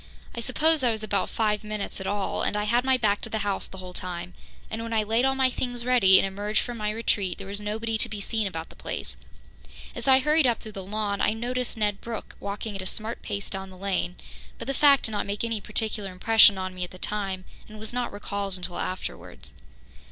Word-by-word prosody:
I - - -5
suppose 305 +6 +2
I 250 - +4
was 220 -1 -1
about 200 -2 0
five 210 -2 +1
minutes 210 -1 -4
at 190 - -4
it - - +1
all 205 -1 -1
and 210 - +1
I 210 - +1
had 235 +4 +3
my 260 0 +4
back 205 -4 +2
to - - -1
the 220 - -1
house 200 -1 0
the 190 - -11
whole 185 -1 -8
time, 180 0 -5 0.3
and 220 +1 -4
when 230 0 -4
I 220 -1 +3
laid 225 +4 +2
all 270 0 +3
my 260 -1 +3
things 245 -1 -3
ready 235 -7 +7
and - - +4
emerged 205 +2 0
from 240 -1 -5
my 210 0 0
retreat, 210 -4 0
there 195 - -7
was 200 +1 -3
nobody 220 +2 -1
to 235 - +3
be 215 -1 -5
seen 215 +1 0
about 165 -3 -5
the - - -14
place. - - -4 0.8
As - - -4
I 265 -1 +8
hurried 300 +1 +4
up 235 -2 +2
through 215 - -9
the 195 -2 -6
lawn, 205 +1 -1
I - - +3
noticed 245 +2 -2
Ned 210 -2 0
Brooke 230 -1 -6
walking 200 +1 -4
at 195 - -3
a 185 - -5
smart 220 +4 -2
pace 200 -1 -3
down 190 -1 -5
the 185 - -12
lane, 185 -2 -1 0.4
but - - -6
the 275 - -1
fact 280 0 +6
did 220 - -1
not 205 -1 -1
make 200 +2 -2
any 230 -2 -1
particular 210 -2 -2
impression 205 +2 +6
on 185 0 -3
me 180 0 -4
at 180 - -4
the 185 - -12
time, 195 -2 -2 0.2
and 215 - -10
was 220 +2 -6
not 245 0 -1
recalled 200 -1 -3
until 180 -1 -5
afterwards. 185 - -5
210 Hz, 245 wpm, -27 LUFS, 195-230 Hz, 0.8 s, I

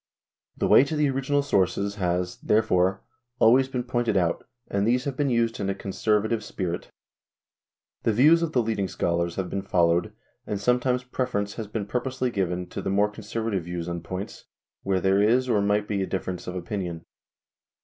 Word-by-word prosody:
The - - 0
way - - +7
to 155 - -3
the 150 -2 +2
original 135 +2 0
sources 100 -5 +1
has, 90 -1 -1
therefore, 95 -4 +2 0.3
always 130 +4 +5
been 125 -2 -3
pointed 120 -4 0
out, 85 -2 0 0.2
and 100 +1 0
these 125 +2 +2
have 140 -2 -3
been 145 0 0
used 115 -1 +1
in 100 -1 -1
a 95 - -1
conservative 105 +3 0
spirit. 90 -4 -4 1.1
The - - +2
views 150 +10 +5
of 165 -2 -1
the 125 - +3
leading 110 -3 -1
scholars 85 -1 -1
have 95 -2 -2
been 100 - -3
followed, 85 -3 +2 0.4
and 105 - -2
some 125 +4 +2
times 125 0 0
preference 125 -5 -2
has 110 -3 -6
been 105 0 -3
purposely 125 +3 -2
given 90 -4 -1
to - - -5
the - - -3
more 100 +2 +2
conservative 105 -4 -3
views 85 -1 -4
on 85 -1 -4
points 95 +4 -6 0.4
where 95 -1 0
there 95 +2 +3
is 120 +5 +3
or 110 -5 +2
might 105 +1 +1
be 100 -2 -1
a 95 - -1
difference 95 -1 -4
of 90 - -4
opinion. 90 -4 -4
105 Hz, 185 wpm, -26 LUFS, 95-125 Hz, 1.1 s, way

